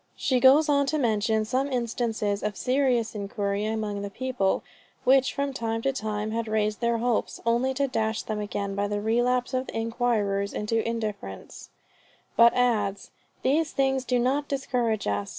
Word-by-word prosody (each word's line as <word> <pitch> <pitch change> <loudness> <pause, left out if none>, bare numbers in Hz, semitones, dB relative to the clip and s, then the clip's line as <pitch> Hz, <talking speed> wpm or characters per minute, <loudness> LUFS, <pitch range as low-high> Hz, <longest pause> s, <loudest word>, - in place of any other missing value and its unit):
She 260 -3 +1
goes 275 +5 +6
on 280 -1 +3
to 310 - 0
mention 220 -4 +1
some 265 +5 -1
instances 230 -4 -1
of 210 -1 -3
serious 255 -3 +1
inquiry 200 0 -2
among 215 -2 -2
the 200 - -4
people, 240 -3 -1 0.4
which 265 -1 +4
from 280 0 -2
time 225 -2 -2
to 270 - +1
time 215 -3 -3
had 230 0 -2
raised 215 -1 0
their 235 0 +1
hopes, 240 0 -1
only 240 +3 +1
to 280 +1 +1
dash 220 -3 -1
them 215 -1 -3
again 200 -1 -3
by 200 +1 -1
the 205 0 -2
relapse 245 +4 +1
of 255 0 -1
the - - -5
inquirers 225 -4 0
into 225 +2 0
indifference; 210 - -6 0.7
but 235 0 +7
adds 210 -5 0 0.3
"These 300 +3 +1
things 270 -1 +1
do 250 -1 +1
not 270 +4 +1
discourage 245 -6 -1
us. 100 0 -1
230 Hz, 170 wpm, -26 LUFS, 210-255 Hz, 0.7 s, but